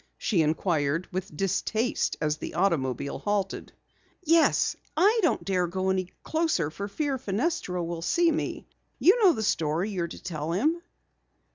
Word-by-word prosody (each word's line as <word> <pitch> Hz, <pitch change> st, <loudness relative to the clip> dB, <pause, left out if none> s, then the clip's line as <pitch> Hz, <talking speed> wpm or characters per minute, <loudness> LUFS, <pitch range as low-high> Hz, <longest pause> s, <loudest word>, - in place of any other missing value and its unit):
she 185 Hz, -7 st, +1 dB
inquired 155 Hz, 0 st, 0 dB
with 180 Hz, -4 st, -5 dB
distaste 215 Hz, +5 st, 0 dB
as 150 Hz, 0 st, 0 dB
the -, -, -7 dB
automobile 140 Hz, -8 st, 0 dB
halted. 205 Hz, -2 st, -2 dB, 0.5 s
"Yes, 330 Hz, 0 st, +3 dB, 0.2 s
I 425 Hz, +5 st, +4 dB
don't 335 Hz, -, +1 dB
dare 185 Hz, -2 st, +1 dB
go 190 Hz, +2 st, -1 dB
any 185 Hz, -1 st, -1 dB
closer 315 Hz, -, 0 dB
for 200 Hz, +5 st, -5 dB
fear 275 Hz, +5 st, -2 dB
Fenestra 205 Hz, -, -1 dB
will 170 Hz, 0 st, -4 dB
see 340 Hz, -, +3 dB
me. 305 Hz, -, -3 dB, 0.3 s
You 390 Hz, +8 st, +5 dB
know 370 Hz, -4 st, +7 dB
the 220 Hz, -, -3 dB
story 165 Hz, +1 st, 0 dB
you're 175 Hz, -4 st, -2 dB
to 170 Hz, -, -11 dB
tell 160 Hz, -2 st, -3 dB
him." 310 Hz, -, +1 dB
190 Hz, 150 wpm, -27 LUFS, 165-275 Hz, 0.5 s, know